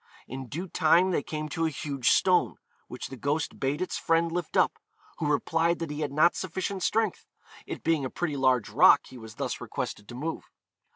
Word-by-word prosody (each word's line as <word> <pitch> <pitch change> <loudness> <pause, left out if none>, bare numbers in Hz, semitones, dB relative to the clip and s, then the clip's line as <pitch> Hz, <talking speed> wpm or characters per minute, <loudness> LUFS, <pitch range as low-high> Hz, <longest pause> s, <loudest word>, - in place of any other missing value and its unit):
In 130 0 -7
due 170 +9 -5
time 170 +3 +3
they 170 - +1
came 155 +1 -5
to 165 +2 0
a - - 0
huge 140 -5 -1
stone, - - +3 0.3
which - - -7
the 135 - -7
ghost 145 +5 -2
bade 140 +5 0
its 185 - -4
friend 165 0 +2
lift 175 -1 -3
up, - - +2 0.4
who 150 -2 0
replied 165 +3 +1
that 165 -3 -4
he 150 - -5
had 150 -2 -2
not 155 +4 +4
sufficient 190 +2 -3
strength, 220 0 0 0.4
it - - -6
being 160 -3 +1
a 130 - -2
pretty 165 -1 -3
large 130 -5 +2
rock 140 +4 +7
he 130 - -11
was 110 -1 -11
thus - - -3
requested 105 - -5
to 120 - -8
move. 160 +6 -5
155 Hz, 205 wpm, -28 LUFS, 135-170 Hz, 0.4 s, rock